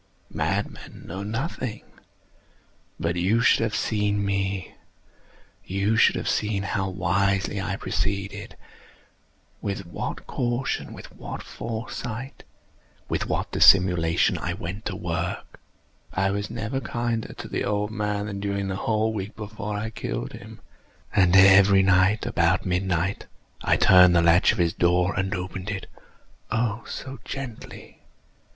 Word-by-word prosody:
Madmen -, -, -3 dB
know 95 Hz, +3 st, -6 dB
nothing. 115 Hz, +2 st, -4 dB, 1.2 s
But 85 Hz, +1 st, -1 dB
you 95 Hz, +7 st, +2 dB
should 115 Hz, -, +4 dB
have 110 Hz, -2 st, 0 dB
seen 105 Hz, -2 st, 0 dB
me. 100 Hz, -1 st, -2 dB, 0.9 s
You 100 Hz, +3 st, 0 dB
should 115 Hz, -, +5 dB
have -, -, -3 dB
seen 105 Hz, -2 st, 0 dB
how 95 Hz, 0 st, -1 dB
wisely 95 Hz, +2 st, 0 dB
I 95 Hz, 0 st, -2 dB
proceeded—with 100 Hz, 0 st, -6 dB
what 85 Hz, -, -5 dB
caution—with 120 Hz, +1 st, -3 dB
what -, -, -7 dB
foresight—with 115 Hz, +2 st, -7 dB
what -, -, -2 dB
dissimulation 90 Hz, -3 st, +4 dB
I 85 Hz, -, -2 dB
went 95 Hz, +3 st, -6 dB
to 100 Hz, -, -3 dB
work! 85 Hz, -2 st, -4 dB, 0.5 s
I 95 Hz, +1 st, +1 dB
was 100 Hz, +1 st, -2 dB
never 115 Hz, +4 st, -3 dB
kinder 120 Hz, -3 st, -2 dB
to -, -, -8 dB
the -, -, -2 dB
old 105 Hz, 0 st, -1 dB
man 105 Hz, -2 st, -2 dB
than 100 Hz, -2 st, -5 dB
during 100 Hz, -1 st, -2 dB
the 95 Hz, -, -2 dB
whole 110 Hz, +1 st, 0 dB
week 100 Hz, -1 st, -5 dB
before 105 Hz, -1 st, -5 dB
I 110 Hz, +2 st, -3 dB
killed -, -, -4 dB
him. -, -, -11 dB, 0.5 s
And 95 Hz, -2 st, +5 dB
every 95 Hz, 0 st, +7 dB
night, 95 Hz, +3 st, +3 dB
about 90 Hz, -6 st, +1 dB
midnight, 90 Hz, 0 st, -1 dB, 0.4 s
I -, -, +3 dB
turned 90 Hz, -1 st, +7 dB
the 85 Hz, -, +5 dB
latch 85 Hz, +2 st, +5 dB
of 110 Hz, -, -4 dB
his 85 Hz, -2 st, +2 dB
door 90 Hz, +2 st, +2 dB
and 95 Hz, +1 st, -1 dB
opened 95 Hz, +2 st, -5 dB
it—oh, 110 Hz, +2 st, -5 dB
so 135 Hz, -2 st, -7 dB
gently! 130 Hz, -5 st, -8 dB
100 Hz, 130 wpm, -25 LUFS, 95-110 Hz, 1.2 s, every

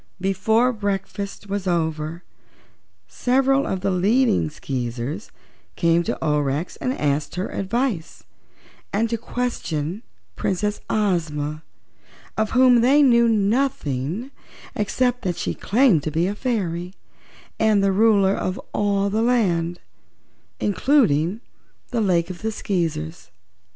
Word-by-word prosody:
Before 220 Hz, +6 st, +2 dB
breakfast 200 Hz, -1 st, -4 dB
was 200 Hz, -1 st, -3 dB
over 160 Hz, -1 st, -1 dB, 0.8 s
several 270 Hz, +2 st, +2 dB
of 190 Hz, -, -2 dB
the 195 Hz, 0 st, 0 dB
leading 210 Hz, +1 st, +2 dB
Skeezers 130 Hz, -, -4 dB, 0.5 s
came 170 Hz, 0 st, +3 dB
to 170 Hz, -, -2 dB
Aurex 150 Hz, +1 st, 0 dB
to 255 Hz, +1 st, -2 dB
ask 145 Hz, +1 st, -1 dB
her 180 Hz, +2 st, -3 dB
advice 200 Hz, -3 st, -2 dB, 0.7 s
and 220 Hz, +3 st, +1 dB
to 230 Hz, -, 0 dB
question 205 Hz, -8 st, -3 dB, 0.3 s
Princess 205 Hz, +2 st, -1 dB
Ozma, 155 Hz, -7 st, -1 dB, 0.7 s
of 215 Hz, 0 st, 0 dB
whom 250 Hz, -2 st, +5 dB
they 280 Hz, +5 st, +5 dB
knew 235 Hz, -3 st, +5 dB
nothing 210 Hz, -, 0 dB, 0.4 s
except 245 Hz, +4 st, 0 dB
that 180 Hz, -2 st, -2 dB
she -, -, -2 dB
claimed 225 Hz, -, +3 dB
to 155 Hz, -, -3 dB
be 160 Hz, +3 st, 0 dB
a 195 Hz, -, -1 dB
fairy 190 Hz, -7 st, -2 dB, 0.6 s
and 215 Hz, -2 st, +3 dB
the 195 Hz, -, +3 dB
Ruler 200 Hz, -1 st, +4 dB
of 185 Hz, -1 st, -2 dB
all 200 Hz, -1 st, +1 dB
the 215 Hz, +2 st, +1 dB
land, 175 Hz, -8 st, +1 dB, 0.8 s
including 205 Hz, -, +2 dB, 0.5 s
the 235 Hz, -2 st, 0 dB
Lake 180 Hz, -3 st, +1 dB
of 180 Hz, -, -9 dB
the 220 Hz, 0 st, -1 dB
Skeezers. 165 Hz, -, -3 dB
195 Hz, 120 wpm, -22 LUFS, 165-230 Hz, 0.8 s, whom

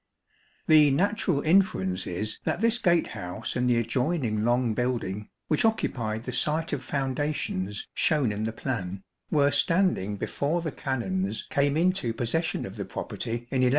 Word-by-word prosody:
The 155 Hz, -2 st, +7 dB
natural 180 Hz, -1 st, +1 dB
inference 95 Hz, -, +2 dB
is 105 Hz, +5 st, -3 dB
that -, -, -1 dB
this 230 Hz, +2 st, +3 dB
gatehouse 135 Hz, -, -1 dB
and 125 Hz, 0 st, +1 dB
the 120 Hz, -, +3 dB
adjoining 125 Hz, -2 st, 0 dB
long 120 Hz, 0 st, +2 dB
building, 110 Hz, -4 st, -2 dB, 0.2 s
which 155 Hz, -, +2 dB
occupied 115 Hz, -, 0 dB
the 125 Hz, -, -4 dB
site 155 Hz, +6 st, 0 dB
of 135 Hz, -3 st, -2 dB
founda 140 Hz, +2 st, -1 dB
tions 100 Hz, -3 st, -3 dB
shown 145 Hz, -8 st, +2 dB
in 105 Hz, +1 st, -2 dB
the 110 Hz, -, -1 dB
plan, 100 Hz, -6 st, -4 dB, 0.3 s
were 145 Hz, -2 st, +3 dB
standing 145 Hz, -, +2 dB
before 155 Hz, -, -1 dB
the 160 Hz, -, -2 dB
Canons 185 Hz, +10 st, -2 dB
came 140 Hz, +1 st, +2 dB
into 175 Hz, -8 st, +1 dB
possession 160 Hz, +9 st, -1 dB
of -, -, -8 dB
the -, -, -3 dB
property 115 Hz, -, -5 dB, 0.2 s
in 130 Hz, -, +1 dB
1196. 125 Hz, -, +4 dB
130 Hz, 155 wpm, -27 LUFS, 110-160 Hz, 0.3 s, The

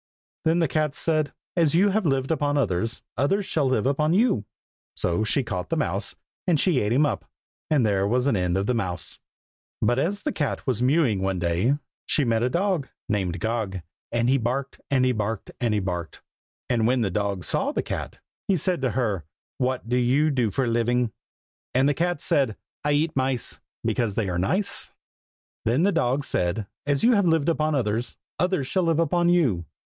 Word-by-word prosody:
Then 160 Hz, +1 st, +3 dB
the 165 Hz, -2 st, +3 dB
cat 150 Hz, 0 st, 0 dB
said, 155 Hz, -2 st, +1 dB, 0.2 s
"As 165 Hz, -3 st, +3 dB
you 195 Hz, +4 st, +5 dB
have 200 Hz, -2 st, +1 dB
lived 135 Hz, 0 st, +1 dB
upon 145 Hz, -2 st, +1 dB
others, 115 Hz, -2 st, -1 dB
others 195 Hz, +9 st, +1 dB
shall 150 Hz, -6 st, +1 dB
live 130 Hz, -5 st, +1 dB
upon 150 Hz, +4 st, +2 dB
you!" 200 Hz, -, +2 dB, 0.5 s
So 85 Hz, +5 st, 0 dB
she 120 Hz, +6 st, +1 dB
caught 90 Hz, -6 st, -4 dB
the -, -, 0 dB
mouse, -, -, -2 dB, 0.3 s
and 165 Hz, -5 st, +3 dB
she 170 Hz, -6 st, +3 dB
ate 105 Hz, -1 st, 0 dB
him 140 Hz, +5 st, +4 dB
up. 145 Hz, -, -1 dB, 0.5 s
And 145 Hz, -6 st, +3 dB
there 100 Hz, -2 st, +2 dB
was 125 Hz, +4 st, +1 dB
an 140 Hz, -, +2 dB
end 90 Hz, -1 st, +1 dB
of 95 Hz, -, 0 dB
the 125 Hz, -, +1 dB
mouse. 90 Hz, -7 st, -3 dB, 0.6 s
But 120 Hz, +1 st, +2 dB
as 200 Hz, +8 st, -1 dB
the 300 Hz, -, 0 dB
cat 150 Hz, -, -2 dB
was 125 Hz, -4 st, 0 dB
mewing 130 Hz, -, +3 dB
one 95 Hz, -1 st, 0 dB
day, 90 Hz, +10 st, +1 dB, 0.3 s
She 150 Hz, -, +3 dB
met 115 Hz, -1 st, +1 dB
a 125 Hz, -, +2 dB
dog, 175 Hz, -2 st, 0 dB, 0.2 s
Named 95 Hz, -4 st, -1 dB
Gog, 110 Hz, -4 st, -2 dB, 0.3 s
And 120 Hz, 0 st, +1 dB
he 135 Hz, +2 st, +3 dB
barked, 130 Hz, +4 st, -3 dB
And 130 Hz, -2 st, +3 dB
he 130 Hz, -, +3 dB
barked, 110 Hz, -2 st, -3 dB
And 120 Hz, -2 st, +2 dB
he 105 Hz, -, +2 dB
barked. 90 Hz, -4 st, -4 dB, 0.4 s
And 115 Hz, -2 st, +2 dB
when 125 Hz, 0 st, +2 dB
the 100 Hz, -4 st, 0 dB
dog 100 Hz, -1 st, -1 dB
saw -, -, 0 dB
the -, -, -1 dB
cat, -, -, -5 dB, 0.3 s
he 195 Hz, -, +3 dB
said 175 Hz, 0 st, 0 dB
to 130 Hz, -2 st, +1 dB
her, 105 Hz, -9 st, 0 dB, 0.4 s
"what 130 Hz, -2 st, -1 dB
do 125 Hz, +1 st, +1 dB
you 135 Hz, +5 st, +3 dB
do 125 Hz, -5 st, +1 dB
for 135 Hz, +5 st, 0 dB
a -, -, -2 dB
living?" 120 Hz, 0 st, +1 dB, 0.6 s
And 130 Hz, +2 st, +4 dB
the 145 Hz, -, +3 dB
cat 175 Hz, 0 st, -1 dB
said, 130 Hz, -7 st, +1 dB, 0.3 s
"I 145 Hz, 0 st, +2 dB
eat 155 Hz, +2 st, +1 dB
mice, 130 Hz, -2 st, 0 dB, 0.3 s
Because 110 Hz, -5 st, 0 dB
they 105 Hz, -4 st, 0 dB
are 90 Hz, -1 st, -1 dB
nice." 185 Hz, -, 0 dB, 0.7 s
Then 125 Hz, +8 st, +2 dB
the 200 Hz, -, +4 dB
dog 140 Hz, -5 st, +1 dB
said, 90 Hz, -2 st, 0 dB, 0.2 s
"As 145 Hz, -1 st, +1 dB
you 245 Hz, -, +6 dB
have 200 Hz, -4 st, +3 dB
lived 160 Hz, -1 st, +3 dB
upon 155 Hz, -2 st, +1 dB
others, 115 Hz, -1 st, -1 dB, 0.2 s
others 180 Hz, -6 st, +1 dB
shall 185 Hz, +8 st, 0 dB
live 165 Hz, -3 st, +2 dB
upon 170 Hz, +1 st, +2 dB
you!" 130 Hz, -, +2 dB
130 Hz, 200 wpm, -25 LUFS, 110-155 Hz, 0.7 s, you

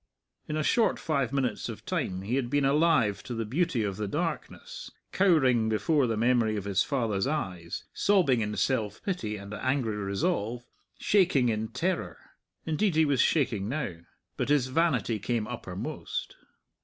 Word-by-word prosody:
In 155 Hz, -, -2 dB
a 155 Hz, -, 0 dB
short 230 Hz, +7 st, +2 dB
five 140 Hz, -6 st, -1 dB
minutes 135 Hz, -2 st, -1 dB
of -, -, -8 dB
time 95 Hz, 0 st, -2 dB
he 110 Hz, +5 st, -3 dB
had 130 Hz, -3 st, -1 dB
been 145 Hz, +1 st, +2 dB
alive 140 Hz, -7 st, +3 dB
to 125 Hz, -, -6 dB
the 115 Hz, 0 st, -2 dB
beauty 140 Hz, 0 st, 0 dB
of 100 Hz, -2 st, -3 dB
the 105 Hz, -1 st, -2 dB
darkness, 180 Hz, -, -4 dB, 0.2 s
cowering 130 Hz, -, +3 dB
before 125 Hz, +6 st, +2 dB
the 115 Hz, -2 st, -1 dB
memory 115 Hz, -2 st, +2 dB
of 100 Hz, -, -3 dB
his 100 Hz, -1 st, +1 dB
father's 115 Hz, -7 st, 0 dB
eyes, 90 Hz, -, -3 dB
sobbing 175 Hz, -, +3 dB
in 105 Hz, 0 st, -2 dB
self 115 Hz, -6 st, -1 dB
pity 115 Hz, -, -2 dB
and 100 Hz, +1 st, -9 dB
angry 125 Hz, -1 st, -1 dB
resolve, 105 Hz, +4 st, -1 dB, 0.3 s
shaking 175 Hz, -, +3 dB
in 110 Hz, 0 st, -1 dB
terror 160 Hz, -, -2 dB, 0.5 s
indeed 165 Hz, +3 st, +1 dB
he 160 Hz, 0 st, +5 dB
was 140 Hz, -4 st, +2 dB
shaking 115 Hz, -10 st, +1 dB
now. 130 Hz, -, -3 dB, 0.4 s
But -, -, -1 dB
his 140 Hz, -3 st, +3 dB
vanity 145 Hz, -7 st, +1 dB
came 110 Hz, +2 st, -1 dB
uppermost. 105 Hz, -6 st, -5 dB
125 Hz, 160 wpm, -28 LUFS, 105-155 Hz, 0.5 s, he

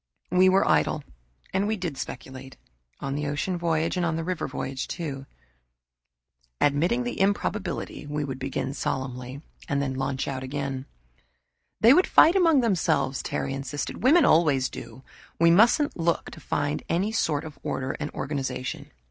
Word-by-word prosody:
We 185 Hz, +1 st, +5 dB
were 190 Hz, +1 st, +3 dB
idle 150 Hz, -, +2 dB, 0.5 s
and 195 Hz, +2 st, +1 dB
we 220 Hz, 0 st, 0 dB
did 175 Hz, -6 st, -4 dB
speculate, 130 Hz, 0 st, -8 dB, 0.4 s
on 135 Hz, 0 st, -3 dB
the 150 Hz, +1 st, -2 dB
ocean 145 Hz, +6 st, -1 dB
voyage 165 Hz, 0 st, 0 dB
and 170 Hz, -3 st, 0 dB
the 165 Hz, -, -2 dB
river 180 Hz, 0 st, -2 dB
voyage, 130 Hz, 0 st, -4 dB
too. 140 Hz, -5 st, -5 dB, 1.3 s
"Admitting 165 Hz, -, +2 dB
the 245 Hz, -5 st, -3 dB
improbability," 200 Hz, -5 st, -1 dB
we'd 145 Hz, -3 st, -3 dB
begin 135 Hz, 0 st, -3 dB
solemnly, 130 Hz, 0 st, -4 dB, 0.3 s
and 140 Hz, -, +1 dB
then 140 Hz, -1 st, -1 dB
launch 135 Hz, 0 st, -2 dB
out 130 Hz, -1 st, -3 dB
again. 135 Hz, 0 st, -4 dB, 0.9 s
"They 230 Hz, +4 st, +8 dB
would 365 Hz, +5 st, +4 dB
fight 330 Hz, +4 st, +6 dB
among 330 Hz, -7 st, +5 dB
themselves," 180 Hz, -, +1 dB
Terry 135 Hz, -, -3 dB
insisted. 135 Hz, +1 st, -4 dB
"Women 295 Hz, +7 st, +6 dB
always 145 Hz, -6 st, +4 dB
do. 130 Hz, -, -9 dB, 0.4 s
We 170 Hz, 0 st, +6 dB
mustn't 235 Hz, -, +4 dB
look 170 Hz, 0 st, -1 dB
to -, -, -11 dB
find 145 Hz, -1 st, -2 dB
any 190 Hz, +6 st, +1 dB
sort 155 Hz, -9 st, 0 dB
of 150 Hz, -3 st, -10 dB
order 130 Hz, 0 st, -2 dB
and 150 Hz, -, -3 dB
organization." 130 Hz, -2 st, -4 dB
150 Hz, 150 wpm, -26 LUFS, 135-185 Hz, 1.3 s, They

